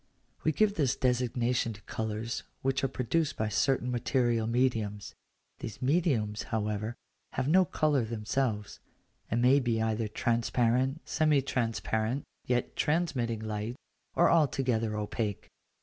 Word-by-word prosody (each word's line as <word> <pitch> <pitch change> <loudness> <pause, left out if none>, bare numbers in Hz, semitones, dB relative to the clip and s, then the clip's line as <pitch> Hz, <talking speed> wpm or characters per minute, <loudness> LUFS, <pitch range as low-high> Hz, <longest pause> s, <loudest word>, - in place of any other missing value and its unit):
We 155 - +3
give 210 +4 +2
this 140 -6 +2
designation 125 -2 +1
to 105 - -13
colours 110 +1 -3 0.2
which 135 0 +1
are - - +3
produced 140 +5 -1
by 110 0 0
certain 125 +3 +1
material 120 -2 +1
mediums: 115 -4 0 0.5
these 110 - -6
mediums, 130 -8 +1
however, 105 +1 -2 0.4
have 130 +1 -1
no 185 +4 +5
colour 150 -6 +1
themselves, 110 -1 -2 0.5
and 120 +2 +1
may 135 +3 +6
be 120 -4 0
either 110 0 0
transparent, 120 +5 +1
semi 150 -3 +3
transparent 115 0 -1 0.2
yet 120 -1 0
transmitting 140 -9 0
light, 110 +2 -3 0.4
or 175 - +5
altogether 125 -9 +2
opaque. 105 0 -3
120 Hz, 125 wpm, -30 LUFS, 110-135 Hz, 0.5 s, may